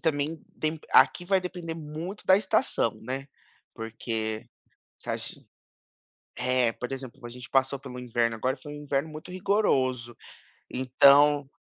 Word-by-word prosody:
também 155 Hz, 0 st, -1 dB, 0.2 s
tem 155 Hz, 0 st, -1 dB
aqui 175 Hz, -, +6 dB
vai 190 Hz, +1 st, +3 dB
depender 180 Hz, -2 st, -5 dB
muito 160 Hz, +5 st, -7 dB
da 190 Hz, -, +7 dB
estação, 200 Hz, -1 st, +1 dB
né, 135 Hz, +2 st, -5 dB, 0.5 s
porque 110 Hz, 0 st, -4 dB, 0.5 s
você -, -, -10 dB
acha -, -, -5 dB, 1.0 s
é, 125 Hz, -2 st, +2 dB
por 125 Hz, +2 st, -6 dB
exemplo, 130 Hz, -2 st, -6 dB
a -, -, -6 dB
gente 125 Hz, +1 st, -10 dB
passou 135 Hz, +1 st, +2 dB
pelo 125 Hz, -2 st, -8 dB
inverno 120 Hz, -2 st, 0 dB
agora, 130 Hz, +4 st, 0 dB
foi 145 Hz, -, -10 dB
um -, -, -7 dB
inverno 145 Hz, +1 st, -2 dB
muito 155 Hz, +3 st, -9 dB
rigoroso, 130 Hz, -, +1 dB, 0.5 s
então 140 Hz, +2 st, +5 dB
140 Hz, 140 wpm, -27 LUFS, 125-160 Hz, 1.0 s, da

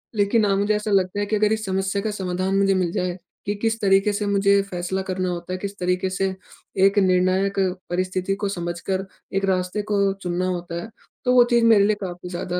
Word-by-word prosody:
लेकिन 210 Hz, +2 st, +3 dB
हाँ, 195 Hz, -1 st, +2 dB
मुझे 205 Hz, +2 st, +1 dB
ऐसा 210 Hz, 0 st, -2 dB
लगता 190 Hz, 0 st, +1 dB
है 205 Hz, -, 0 dB
कि 215 Hz, -, -1 dB
अगर 210 Hz, 0 st, +2 dB
इस 220 Hz, 0 st, -3 dB
समस्या 195 Hz, +1 st, -1 dB
का 215 Hz, -, -2 dB
समाधान 190 Hz, -1 st, -2 dB
मुझे 195 Hz, 0 st, +3 dB
मिल 180 Hz, -3 st, 0 dB
जाए, 180 Hz, 0 st, -2 dB, 0.3 s
कि 205 Hz, +1 st, -1 dB
किस 225 Hz, +2 st, -1 dB
तरीक़े 195 Hz, +1 st, +3 dB
से 205 Hz, 0 st, -2 dB
मुझे 200 Hz, 0 st, +3 dB
फैसला 180 Hz, +1 st, -2 dB
करना 185 Hz, 0 st, -1 dB
होता 175 Hz, +1 st, -4 dB
है, -, -, -2 dB
किस 200 Hz, +1 st, -6 dB
तरीक़े 180 Hz, +1 st, 0 dB
से 190 Hz, 0 st, -1 dB, 0.5 s
एक 195 Hz, +1 st, +3 dB
निर्णायक 185 Hz, +1 st, +2 dB, 0.3 s
परिस्थिति 185 Hz, +2 st, -1 dB
को 205 Hz, 0 st, -2 dB
समझकर 175 Hz, +1 st, -3 dB, 0.3 s
एक 195 Hz, 0 st, +1 dB
रास्ते 185 Hz, +2 st, 0 dB
को 200 Hz, -1 st, +3 dB
चुनना 180 Hz, +1 st, -1 dB
होता 175 Hz, -1 st, -3 dB
है, 225 Hz, -, -8 dB, 0.4 s
तो 250 Hz, -, +3 dB
वो 245 Hz, -1 st, +7 dB
चीज 235 Hz, -1 st, +4 dB
मेरे 225 Hz, -3 st, +6 dB
लिए 215 Hz, +1 st, +2 dB
काफ़ी 180 Hz, -1 st, -6 dB
ज़्यादा 180 Hz, 0 st, -3 dB
195 Hz, 215 wpm, -23 LUFS, 180-205 Hz, 0.5 s, वो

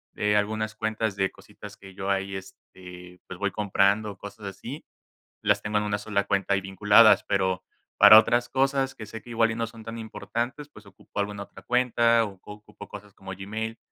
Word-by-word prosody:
eh, 105 Hz, 0 st, +1 dB
algunas 110 Hz, +1 st, -1 dB
cuentas 110 Hz, -1 st, -2 dB
de 95 Hz, -1 st, 0 dB
cositas 105 Hz, +1 st, -13 dB
que 95 Hz, -1 st, -14 dB
yo 95 Hz, 0 st, -5 dB
ahí, 95 Hz, 0 st, -1 dB
este, 90 Hz, -1 st, -13 dB
pues, 95 Hz, -, -8 dB
voy 100 Hz, 0 st, -1 dB
comprando, 100 Hz, 0 st, +1 dB
cosas 100 Hz, +2 st, -10 dB
así, 115 Hz, -, -8 dB, 0.6 s
las -, -, +2 dB
tengo 105 Hz, 0 st, 0 dB
en 105 Hz, -, -2 dB
una 105 Hz, 0 st, -1 dB
sola 100 Hz, -2 st, -1 dB
cuenta 100 Hz, 0 st, 0 dB
y 95 Hz, -, -1 dB
vinculadas. 105 Hz, +3 st, +5 dB
Pero 95 Hz, -2 st, -1 dB, 0.3 s
para 110 Hz, -, +10 dB
otras 120 Hz, +2 st, +2 dB
cosas 135 Hz, 0 st, 0 dB
que 110 Hz, -, -9 dB
sé 115 Hz, +2 st, -8 dB
que 120 Hz, -, -15 dB
igual 115 Hz, -1 st, +2 dB
y 110 Hz, -, -4 dB
no 115 Hz, 0 st, -1 dB
son 115 Hz, 0 st, -12 dB
tan 115 Hz, +1 st, -7 dB
importantes, 120 Hz, +6 st, -5 dB
pues 105 Hz, -7 st, -16 dB
ocupo 100 Hz, +1 st, -12 dB
alguna 100 Hz, 0 st, -3 dB
otra -, -, -15 dB
cuenta, 120 Hz, -2 st, +2 dB
ocu 100 Hz, 0 st, -10 dB
ocupo 105 Hz, 0 st, -13 dB
cosas 105 Hz, -1 st, -11 dB
como 95 Hz, 0 st, -9 dB
Gmail, 110 Hz, +4 st, -5 dB
105 Hz, 195 wpm, -26 LUFS, 100-115 Hz, 0.6 s, para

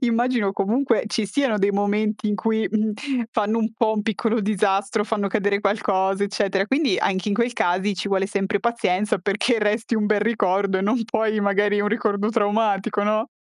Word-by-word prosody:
immagino, 240 Hz, -3 st, +1 dB
comunque, 230 Hz, +5 st, +1 dB
ci 215 Hz, 0 st, -1 dB
siano 225 Hz, +1 st, 0 dB
dei 200 Hz, 0 st, +2 dB
momenti 210 Hz, +2 st, 0 dB
in 205 Hz, -, 0 dB
cui, 220 Hz, 0 st, 0 dB
mhmm, 220 Hz, +4 st, -1 dB
fanno 220 Hz, 0 st, 0 dB
un 220 Hz, 0 st, 0 dB
po' 220 Hz, -1 st, +1 dB
un 215 Hz, -, -1 dB
piccolo 225 Hz, +2 st, -1 dB
disastro, 205 Hz, 0 st, 0 dB
fanno 205 Hz, -2 st, -1 dB
cadere 205 Hz, -1 st, 0 dB
qualcosa, 195 Hz, -1 st, 0 dB
eccetera. 200 Hz, -1 st, -1 dB
Quindi, 270 Hz, +4 st, +1 dB
anche 190 Hz, +1 st, -1 dB
in 200 Hz, -, 0 dB
quei 235 Hz, +2 st, 0 dB
casi, 190 Hz, 0 st, 0 dB
ci 190 Hz, +2 st, -4 dB
vuole 195 Hz, -1 st, +1 dB
sempre 200 Hz, 0 st, -1 dB
pazienza 210 Hz, -4 st, 0 dB
perché 205 Hz, +6 st, 0 dB
resti 215 Hz, +2 st, 0 dB
un 215 Hz, -2 st, +1 dB
bel 210 Hz, -1 st, +2 dB
ricordo 200 Hz, -3 st, +1 dB
e -, -, -2 dB
non 220 Hz, +4 st, 0 dB
poi, 220 Hz, -1 st, 0 dB
magari, 205 Hz, 0 st, +1 dB
un 205 Hz, -, 0 dB
ricordo 210 Hz, -2 st, 0 dB
traumatico, 210 Hz, -1 st, 0 dB
no? 215 Hz, +2 st, 0 dB
210 Hz, 185 wpm, -22 LUFS, 200-225 Hz, -, dei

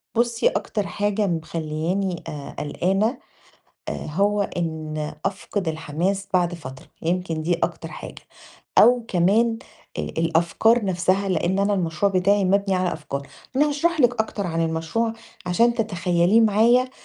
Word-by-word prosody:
بُصي 235 Hz, 0 st, +2 dB
أكتر 210 Hz, -3 st, -1 dB
حاجة 205 Hz, 0 st, 0 dB
مخلّياني 165 Hz, +2 st, -2 dB
آآ 140 Hz, -2 st, -7 dB
قلقانة، 195 Hz, -, 0 dB, 0.7 s
آآ -, -, -5 dB
هو 205 Hz, +4 st, +2 dB, 0.2 s
إن 155 Hz, -2 st, -3 dB
أفقد 200 Hz, -1 st, -2 dB
الحماس 165 Hz, +6 st, -2 dB
بعد 175 Hz, -1 st, +2 dB
فترة، 135 Hz, -6 st, -9 dB
يمكن 170 Hz, -1 st, -1 dB
دي 175 Hz, +2 st, +1 dB
أكتر 165 Hz, -, -2 dB
حاجة، -, -, -9 dB, 0.6 s
أو 245 Hz, -1 st, +6 dB
كمان 220 Hz, +6 st, +2 dB, 0.4 s
آآ -, -, 0 dB
الأفكار 170 Hz, +8 st, +2 dB
نفسها 190 Hz, +2 st, +1 dB
لأن 185 Hz, +1 st, 0 dB
أنا 200 Hz, +1 st, +2 dB
المشروع 180 Hz, +2 st, 0 dB
بتاعي 195 Hz, +2 st, +3 dB
مبْنِي 195 Hz, +1 st, +2 dB
على 180 Hz, -1 st, 0 dB
أفكار. 140 Hz, 0 st, -5 dB, 0.3 s
أنا 295 Hz, +2 st, +4 dB
هاشرح 320 Hz, +3 st, 0 dB
لِك 245 Hz, -3 st, +3 dB
أكتر 205 Hz, -3 st, -2 dB
عن 165 Hz, -1 st, 0 dB
المشروع 165 Hz, +8 st, -1 dB, 0.3 s
عشان 235 Hz, +7 st, +3 dB
تتخيليه 180 Hz, -1 st, +2 dB
معايا 235 Hz, +4 st, +4 dB
190 Hz, 135 wpm, -23 LUFS, 165-215 Hz, 0.7 s, أو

